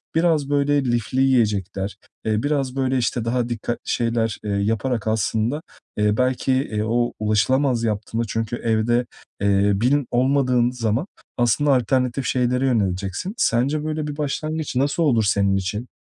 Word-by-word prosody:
Biraz 160 -4 +2
böyle 145 -1 +2
lifli 120 +1 0
yiyecekler, 105 -6 0 0.3
eee, 110 0 0
biraz 140 -3 -1
böyle, 130 -1 +1
işte, 120 -1 -1
daha 120 0 0
dikkatli 120 0 -3
şeyler, 115 -2 0
eee, 105 - -3
yaparak 110 +3 -1
aslında, 110 +5 0 0.4
eee, 105 0 +2
belki, 130 +1 +1
eee, 115 -5 -1
o 120 +2 0
ulaşılamaz 115 +4 +2
yaptığında 110 +1 -1
çünkü 115 +2 -2
evde, 120 +1 +1 0.4
eee, 100 0 +3
bin 125 +6 +1
olmadığın 125 -1 +2
zaman 120 - -1 0.3
aslında 125 +5 +3
alternatif 130 +1 0
şeylere 125 +1 +1
yöneleceksin. 100 - -1
Sence 140 - +1
böyle 155 -1 -2
bir 145 -1 -5
başlangıç 155 0 -3
nasıl 140 +6 +1
olur 120 -8 +3
senin 100 -1 +2
için? 95 +5 -3
120 Hz, 140 wpm, -22 LUFS, 110-135 Hz, 0.4 s, eee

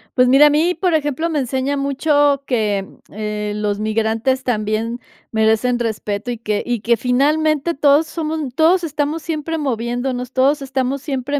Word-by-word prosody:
Pues, 250 -1 +4
mira, 275 +4 +7
a - - +4
mí, 315 +5 +2
por 355 +1 0
ejemplo, 305 +1 0
me 310 -3 0
enseña 265 +2 -1
mucho 280 0 +1
que, 210 -5 0 0.2
eh, 210 0 -4
los 210 -1 -2
migrantes 225 +4 0
también 225 0 -1 0.3
merecen 220 +3 +2
respeto 220 -1 -3
y 240 - -4
que 215 -2 -2
y 240 -3 -2
que, 235 +2 +2
finalmente, 300 +6 +1
todos 290 +2 +4
somos 320 -1 -3 0.2
todos 340 +4 +3
estamos 300 0 -2
siempre 325 0 -3
moviéndonos, 250 -2 -2
todos 275 +3 +2
estamos 265 0 -2
siempre 280 0 -2
260 Hz, 160 wpm, -19 LUFS, 225-295 Hz, 0.3 s, mira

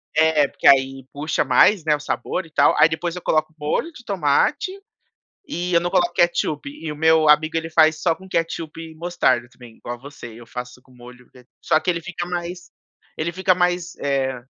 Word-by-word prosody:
É, 155 -2 +4
porque - - -1
aí 135 -1 +4
puxa 150 +3 -1
mais, 160 +8 +4
né, 150 -1 +2
o - - -7
sabor 165 +4 -3
e 165 - -18
tal, - - +4
aí 150 - +7
depois 165 +2 -3
eu 180 - -7
coloco 155 -1 0
molho 150 - -2
de 245 -7 -15
tomate, 200 - +1 0.8
e 180 - -3
eu 170 - +5
não 175 +1 -2
coloco 175 -2 +1
ketchup, 170 -4 0
e 160 +2 -7
o 150 - -6
meu 160 0 +4
amigo 155 +2 +4
ele 165 0 -5
faz 160 -1 +3
só 165 -1 +2
com 190 +3 -15
ketchup 165 -2 -3
e 165 -1 -9
mostarda 160 -7 0
também, 120 -3 -15
igual 120 - -7
a - - -21
você, 140 -2 -11
eu 120 - -13
faço 125 +1 -8
com 130 - -24
molho, 125 0 -15
d 125 -1 -19 0.2
só 155 - +3
que 160 +3 -1
ele 170 -1 -2
fica 175 +1 -5
mais 175 0 -6 0.5
ele 170 +2 -2
fica 185 +1 +2
mais, 180 0 -1
eh, 135 -3 -2
160 Hz, 210 wpm, -21 LUFS, 140-175 Hz, 0.8 s, aí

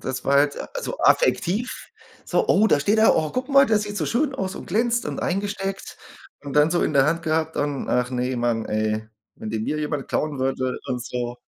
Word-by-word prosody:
Das 130 -1 -4
war 140 - +3
halt 145 0 +3 0.2
so - - -5
affektiv. 235 - +2 0.5
So: - - 0
„Oh, 210 +3 +5
da 150 - +3
steht 205 +9 +2
er. 220 - +6
Oh, 155 -1 0
guck 255 +2 -3
mal, 275 0 +6
der 220 -3 +3
sieht 205 0 -5
so - - -1
schön 270 +3 0
aus 190 -7 -3
und - - -9
glänzt 235 +5 +1
und - - -4
eingesteckt.“ 195 +1 -3 0.5
Und 140 -1 -7
dann 150 +2 +4
so 175 - +1
in - - 0
der 135 0 +4
Hand 165 +2 0
gehabt 160 0 -1
und: 145 -1 -2
„Ach 125 0 +1
ne, 125 0 -1
Mann, 120 -2 0
ey, 110 0 -1 0.3
wenn 110 - -7
den 110 0 -2
mir 150 +5 -2
jemand 150 -2 -3
klauen 150 -2 -1
würde 130 -1 -1
und 125 -1 -3
so.“ 120 -1 -4
150 Hz, 220 wpm, -23 LUFS, 130-205 Hz, 0.5 s, er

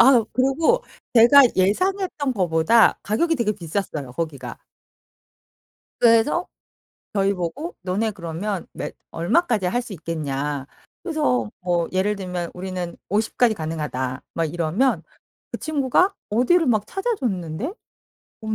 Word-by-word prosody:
아 230 - +4
그리고 315 - +2 0.3
제가 245 +4 +8
예상했던 300 - +1
것보다 180 +3 +4
가격이 325 +11 +1
되게 235 -5 +1
비쌌어요 165 -7 -4
거기가. 155 -2 -5 1.4
그래서 235 +9 +4 0.7
저희 195 -1 +2
보고 200 - -4
"너네 195 +5 0
그러면 180 +2 -4
몇 - - -6 0.2
얼마까지 210 - +1
할 240 +7 0
수 235 - -9
있겠냐?" 145 -5 -3 0.4
그래서 125 - 0
뭐 175 -2 0
예를 190 +3 +1
들면 180 -3 -4
"우리는 180 -1 -5
50 215 +3 -1
까지 240 -3 +4
가능하다." 150 -7 -3
막 165 - 0
이러면 170 - 0 0.5
그 - - -4
친구가 310 +5 +2 0.2
어디를 255 +10 +3
막 215 -4 +2
찾아줬는데 250 - -2 0.7
어머 220 -1 -2
200 Hz, 270 characters per minute, -23 LUFS, 170-255 Hz, 1.4 s, 제가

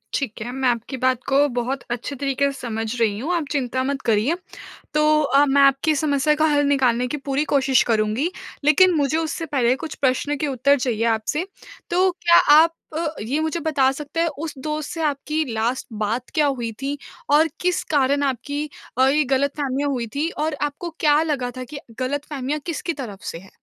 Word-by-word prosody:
ठीक 245 -6 -3
है, 240 +2 -4
मैं 260 0 +1
आपकी 240 +3 -2
बात 255 -1 +1
को 280 +2 +4
बहुत 245 +2 -2
अच्छे 245 +4 -4
तरीके 275 +1 0
से 275 - -10
समझ 225 0 -3
रही 210 -3 +1
हूँ 315 +9 -2
आप 330 -3 -1
चिंता 260 -2 -1
मत 275 0 -2
करिए। 230 +8 +2 0.6
तो 305 0 +4
अ, 280 +1 +4
मैं 280 0 +3
आपकी 275 +3 +4
समस्या 285 0 +2
का 310 +1 +2
हल 290 -2 +3
निकालने 250 -3 +2
की 295 - -3
पूरी 275 +1 +1
कोशिश 265 -2 +4
करूँगी 220 +7 +1 0.3
लेकिन 340 +5 +5
मुझे 295 +1 +1
उससे 325 0 -2
पहले 255 -4 +2
कुछ 320 - -6
प्रश्न 280 +2 0
के 300 - -1
उत्तर 280 +1 +2
चाहिए 230 -3 -1
आपसे। 230 +10 0 0.4
तो 370 +2 +3
क्या 345 -1 +4 0.2
आप 330 +2 +6 0.2
अ, 335 - -1 0.2
ये 265 +8 -1
मुझे 315 +2 -1
बता 280 -4 +2
सकते 295 +4 -6
हैं 335 - +3
उस 315 -1 -4
दोस्त 305 +2 -4
से 330 - -4
आपकी 300 +1 -1
लास्ट 230 +4 -1 0.2
बात 235 +4 -2
क्या 305 -2 +3
हुई 240 -5 -2
थी? 280 +1 -2 0.3
और 300 +3 +5
किस 360 0 +1
कारण 285 0 +3
आपकी 285 +2 -2 0.3
अ, 260 +1 +5
ये 295 +3 +3
गलतफहमियाँ 280 0 -1
हुई 245 -4 -2
थी 310 +3 0
और 310 -1 -2
आपको 295 +4 -3
क्या 300 0 +4
लगा 270 -6 -2
था 255 - -4
कि 280 +3 -8 0.2
गलतफहमियाँ 285 +1 -3
किसकी 335 0 -3
तरफ 205 -6 -8
से - - -6
है? 190 +2 -14
280 Hz, 195 wpm, -22 LUFS, 255-300 Hz, 0.6 s, आप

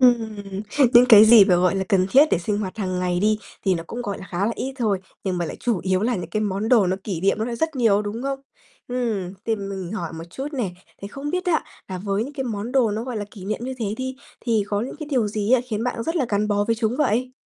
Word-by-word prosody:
Ừm, 235 -4 +4 0.6
những 245 +1 +8
cái 215 -2 +10
gì 220 -2 +9
mà 180 -3 +4
gọi 180 +1 +2
là 190 - 0
cần 185 -2 +3
thiết 280 +3 +7
để - - +3
sinh 205 +4 -2
hoạt 195 0 -4
hàng 185 -2 -2
ngày 180 0 0
đi 215 +1 +2 0.3
thì 190 -2 +3
nó 165 - -3
cũng 240 +6 -5
gọi 200 -3 -4
là 190 - -9
khá 190 +3 0
là 230 - 0
ít 265 - -4
thôi. 210 -5 +1 0.3
Nhưng 185 -2 -1
mà 170 - 0
lại - - -6
chủ 235 -6 0
yếu 185 0 +1
là 245 +2 +1
những 180 - -6
cái 215 - -1
món 205 +1 -1
đồ 230 -6 +5
nó 185 +1 0
kỷ 185 -6 -3
niệm 195 +3 +2
nó 220 - 0
lại 235 -1 -4
rất 320 +1 -1
nhiều, 210 -4 +3
đúng 210 +3 -5
không? 275 0 -2 0.5
Ừm, 225 -7 -2
thì 225 -1 +1
mình 195 -2 -5
hỏi 170 -7 -4
một 165 0 -7
chút 270 +7 -5
nè, 235 -9 -2 0.3
thì 200 - -5
không 280 +5 -5
biết 365 +1 -1
á, 330 -3 +2 0.2
là 185 -1 -4
với 200 +3 -1
những 280 - -8
cái 270 -2 -4
món 220 0 -4
đồ 250 -5 +3
nó 220 +3 -3
gọi 250 -3 -4
là 205 - -3
kỷ 190 -3 -11
niệm 215 +3 -3
như 260 +1 -4
thế 225 - -2
đi 260 +1 -4 0.2
thì 225 -4 +1
có 205 0 0
những 245 - -5
cái 305 - -6
điều 245 -6 +2
gì 210 +3 -1
á 255 - +6
khiến 220 0 -2
bạn 240 -2 -2
rất 330 +5 -2
là 265 -6 +1
gắn 210 +1 0
bó 205 0 +1
với 230 +2 +1
chúng 225 +1 0
vậy? 255 -2 +1
215 Hz, 290 wpm, -23 LUFS, 195-245 Hz, 0.6 s, cái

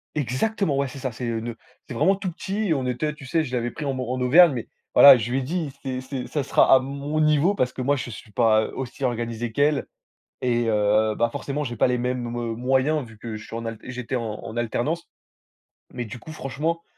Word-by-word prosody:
Exactement, 150 - 0
ouais, 140 0 +1
c'est 135 +1 -9
ça, 130 -1 -3
c'est, 120 +2 -6
heu, 115 -1 -1
le 115 0 -6 0.3
c'est - - -6
vraiment 155 +11 +3
tout 190 -2 -4
petit 200 +4 -3
et - - +4
on 135 -4 -1
était 150 +5 -1
tu 145 - -12
sais, 160 +5 +1
je 125 -4 -4
l'avais 120 0 -1
pris 150 - -6
en 135 - 0
mor 130 -2 -4
en 130 - -2
Auvergne 155 +5 +7
mais 120 - -5 0.3
voilà, 140 -1 +11
je 115 -1 -2
lui 125 - 0
ai - - -2
dit: 155 +1 -2
«C'est 130 -2 -3
c'est 130 -1 -5
ça 150 - -2
sera 135 0 +4
à 130 - +8
mon 140 +3 -3
niveau» 155 +5 +3
parce 125 -8 +1
que 130 - -5
moi, 145 +3 +2
je 125 - -5
suis 110 -1 -10
pas, 110 -1 +3
heu, - - -6
aussi 135 +1 -6
organisé 120 -1 -2
qu'elle 145 +4 +2 0.6
et 120 -1 +1
heu, 105 0 +3
bah, 115 +1 +1
forcément, 145 +2 -3
j'ai 120 -3 -4
pas - - +3
les 125 -1 0
mêmes, 125 0 -2
heu, 115 -1 -3
moyens 130 +4 +1
vu 110 -2 -15
que 115 -1 -6
je 105 - -8
suis - - -8
en 115 - -4
al 115 0 -4
j'étais 125 +1 -5
en 120 - -1 0.2
en 110 - -7
alternance. 120 +8 -1 0.9
Mais 120 -1 -4
du 115 +3 -8
coup, 160 - -10
franchement, 155 +4 -3
130 Hz, 245 wpm, -24 LUFS, 120-145 Hz, 0.9 s, voilà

